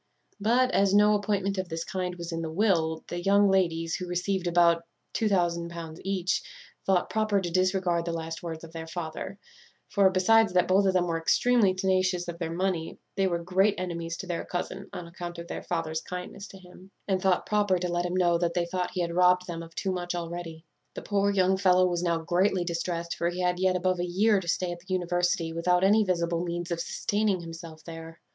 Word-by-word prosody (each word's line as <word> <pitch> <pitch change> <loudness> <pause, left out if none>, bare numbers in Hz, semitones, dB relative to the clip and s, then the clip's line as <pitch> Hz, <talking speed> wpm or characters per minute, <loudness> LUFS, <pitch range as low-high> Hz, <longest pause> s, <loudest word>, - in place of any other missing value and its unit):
"But, 245 +5 +3
as 200 -3 +3
no 210 +1 +6
appointment 200 -1 0
of 185 -1 -3
this 165 0 -3
kind 180 -1 -3
was 170 -1 -6
in 165 0 -3
the 160 - -3
will, 160 -3 +1
the 175 - -4
young 200 +2 +4
ladies, 165 -3 +1
who 180 +2 -3
received 180 +1 -1
about 170 -1 +4 0.4
each, 175 -2 -1 0.5
thought 190 -2 +3
proper 215 -2 +1
to 175 -3 -4
disregard 185 -2 +1
the 170 - -2
last 165 0 -5
words 165 -2 -6
of 165 - -10
their 165 -1 -6
father; 165 +3 -5 0.5
for, 200 -2 +4
besides 215 +3 +4
that 180 -1 +3
both 195 +1 +4
of 190 - +3
them 180 -1 +2
were 165 -1 -1
extremely 210 +3 +3
tenacious 185 -1 +1
of 170 -1 -6
their 165 -2 -3
money, 175 -2 -2 0.2
they 195 -1 +2
were 170 -2 -2
great 190 +4 +2
enemies 170 -2 -4
to 195 - -6
their 175 -2 -3
cousin, 185 +2 -5
on 175 - -6
account 175 0 -7
of 170 0 -7
their - - -5
father's 160 -2 -2
kindness 180 +2 -7
to 195 - -12
him; 185 0 -15 0.2
and 190 -2 +1
thought 185 -2 +2
proper 205 -3 +2
to 180 0 -2
let 175 0 -1
him 175 - -3
know 175 -2 +3
that 170 -1 -1
they 175 -1 +1
thought 180 +1 -2
he 180 - 0
had 170 -1 -2
robbed 180 +1 +4
them 170 -2 -5
of 165 0 -11
too 190 - -1
much 175 -1 -3
already. 170 -1 -6 0.3
"The - - -6
poor 200 -1 +1
young 190 -1 +3
fellow 185 -1 +4
was 175 -1 0
now 170 -2 +1
greatly 175 +3 +1
distrest; 170 0 -3
for 170 - 0
he 180 +1 -4
had 180 0 +1
yet 185 0 +2
above 185 0 0
a - - 0
year 200 +4 +3
to 180 - -9
stay 180 +1 0
at 175 - -6
the 185 +2 -13
university, 175 -2 0
without 180 +2 +2
any 210 +3 +5
visible 170 -3 0
means 175 0 -4
of 170 - -1
sustaining 205 +2 0
himself 165 -1 -9
there. 165 0 -9
180 Hz, 215 wpm, -28 LUFS, 170-190 Hz, 0.5 s, no